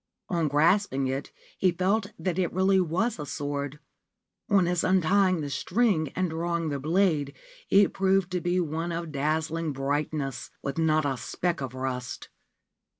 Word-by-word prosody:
On 170 -3 +1
grasping 150 0 +2
it 135 +2 -3 0.3
he 185 - +4
felt 195 +4 0
that 175 +2 -2
it 180 - +1
really 190 +1 +3
was 185 +6 0
a 150 - -4
sword. 145 +1 -3 0.7
On 200 -3 +4
his 175 -1 0
untying 185 0 +3
the 145 - -4
string 180 - +1
and 185 -2 0
draw 170 +1 -1
ing 165 -2 -2
the 140 -1 -2
blade, 155 -2 +1 0.3
it 200 0 +5
proved 190 -1 +2
to 180 -1 -1
be 175 +1 +1
one 165 0 -2
of 170 -1 -4
dazzling 155 +2 -1
brightness, 135 -1 -2
with 140 +3 -3
not 155 -1 +2
a 135 -2 0
speck 175 +4 -2
of 130 -2 -5
rust. 130 -1 -4
165 Hz, 160 wpm, -27 LUFS, 145-185 Hz, 0.7 s, it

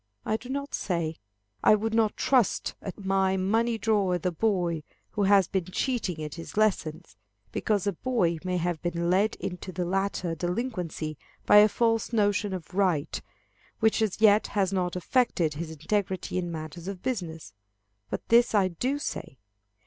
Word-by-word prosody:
I 215 - +1
do 245 +3 -7
not 280 +1 -4
say, 170 -4 -2 0.5
I - - +7
would 220 +1 -2
not 225 -2 +2
trust 250 -7 +2
at 195 0 -7
my 190 0 +2
money 225 +5 +1
drawer 205 -4 +2
the 180 +1 -1
boy 175 -4 0 0.3
who 210 - -2
has 195 -2 +5
been 190 -3 -1
cheating 185 - -2
at 150 - -5
his 165 +4 -9
lessons, 175 - 0 0.4
because 205 -3 0
a 200 - +1
boy 175 -6 0
may 180 -1 -1
have 175 -2 -1
been 170 0 -1
led 200 +4 +2
into 185 0 -6
the 180 0 -2
latter 190 -1 -1
delinquency 175 - -3 0.3
by - - +7
a 210 +1 +8
false 225 +1 +1
notion 205 -1 +2
of 180 -2 -6
right, 180 -7 +1 0.6
which 220 0 +3
as 215 -3 0
yet 215 -1 +5
has 195 -2 0
not 180 -2 0
affected 180 - +1
his 160 +2 -5
integrity 185 +3 -2
in 175 -1 -3
matters 160 +2 -7
of 195 -2 -6
business. 165 - -4 0.6
But - - -5
this 235 -1 +5
I 195 -2 +4
do 250 - -1
say. 210 - -5
190 Hz, 165 wpm, -27 LUFS, 170-215 Hz, 0.6 s, a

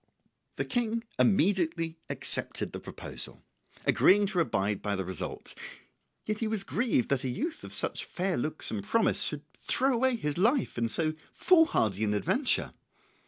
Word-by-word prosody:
The - - -2
King 230 -2 -1 0.2
immediately 165 -5 +1
accepted - - +2
the - - -5
proposal, - - -5 0.4
agreeing 205 +2 +5
to 195 -2 -1
abide 105 - 0
by 105 -1 -2
the 95 -1 -3
result; 95 0 -6 0.7
yet 215 +1 -3
was 220 -3 -1
he - - -24
grieved 225 - 0
that 140 -1 0
a 130 - -2
youth 315 - -4
of - - -9
such - - +2
fair 185 0 -2
looks 155 +5 -1
and 105 -3 -3
promise 230 - +1
should - - -1
throw 270 +1 +1
away 255 +1 +2
his 150 -7 -2
life 240 +7 +2
in 115 -1 0
so 155 +4 +1 0.2
foolhardy 110 - +3
an 105 -1 +1
adventure. 245 - +1
180 Hz, 160 wpm, -29 LUFS, -, 0.7 s, agreeing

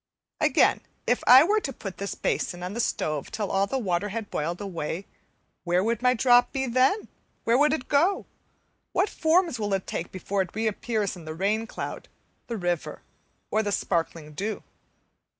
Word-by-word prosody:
Again, - - +3 0.2
if 245 - +1
I 255 +3 +10
were 415 +6 +3
to 300 -9 -4
put 195 -6 -8
this 200 0 -4
basin 175 -1 -2
on 180 +2 -4
the 235 - -4
stove 155 -10 -1
till 210 -3 -3
all 195 +1 +2
the 265 - -1
water 195 -4 -1
had 215 0 -5
boiled 170 +4 -2
away, 185 -2 -4 0.6
where 180 +1 +2
would 230 +1 0
my 250 0 +4
drop 245 +1 +5
be 265 -1 -1
then? 260 - +2 0.4
Where 230 - +3
would 295 +3 +4
it 275 -4 -2
go? 335 +8 +2 0.7
What 420 - +2
forms 325 -4 +2
will 205 -2 0
it 190 - -4
take 170 - -4
before 190 +1 -2
it 185 0 -5
reappears 220 -1 -1
in 170 -3 -11
the 155 0 -6
rain 210 +5 0
cloud, - - -6 0.4
the 235 - -3
river, 175 -3 -2 0.5
or 220 - +3
the 205 -1 -2
sparkling 165 -5 -2
dew? 205 +8 -3
210 Hz, 180 wpm, -26 LUFS, 180-250 Hz, 0.7 s, I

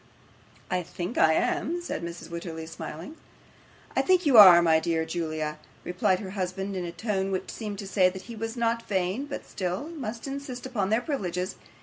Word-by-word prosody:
'I 180 - +1
THINK 180 +5 -5
I 160 - +6
am,' 350 - 0
said 345 - -4
Mrs. 170 0 -7
Wititterly, 170 -1 -5
smiling. 160 - -8 0.8
'I - - +4
think 370 -2 +3
you 280 -4 +4
are, 185 -5 +11
my 165 -2 +4
dear 160 0 0
Julia,' 155 -2 -3 0.2
replied 180 +2 +1
her 190 -2 -6
husband, 195 0 -3
in 180 -1 -2
a 170 - -4
tone 195 -1 -2
which 185 - -3
seemed 210 -3 -5
to 195 - -6
say 190 -2 +4
that 190 +1 -8
he 235 - -9
was 225 +2 -5
not 230 0 0
vain, 190 +6 0
but 280 - -6
still 185 - -3
must 245 -9 -6
insist 275 -3 -6
upon 215 -7 -1
their 220 +3 +2
privileges. 185 - -3
190 Hz, 190 wpm, -27 LUFS, 175-235 Hz, 0.8 s, are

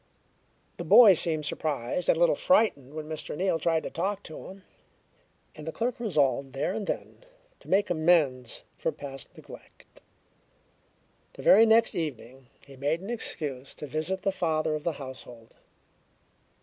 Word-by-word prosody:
The - - -5
boy 220 -5 +8
seemed 155 -3 0
surprised 150 +1 -2
and - - +4
a - - -3
little 170 -1 +4
frightened 150 - +1
when 155 -1 -6
Mr. 155 -1 -5
Neal 185 -3 0
tried 160 0 +1
to - - -6
talk 195 +4 -3
to 155 - -10
him, 190 0 -12 0.9
and 155 +1 -10
the - - -2
clerk 240 +7 -3
resolved 140 - 0
there 140 +7 -2
and 210 -1 -4
then - - -5 0.4
to - - -16
make 195 0 +2
amends 155 -7 +1 0.2
for - - -1
past 135 -1 -10
neglect. - - -15 1.3
The - - -11
very 225 +3 +7
next 225 +1 +4
evening 135 -5 -6 0.2
he 135 -1 -14
made 145 +6 -1
an 200 +5 -6
excuse 145 - -5
to - - -7
visit 160 +6 -3
the 195 - +1
father 160 -4 -1
of 155 -1 -4
the 170 - -1
household. 130 -4 -11
155 Hz, 160 wpm, -27 LUFS, 140-190 Hz, 1.3 s, boy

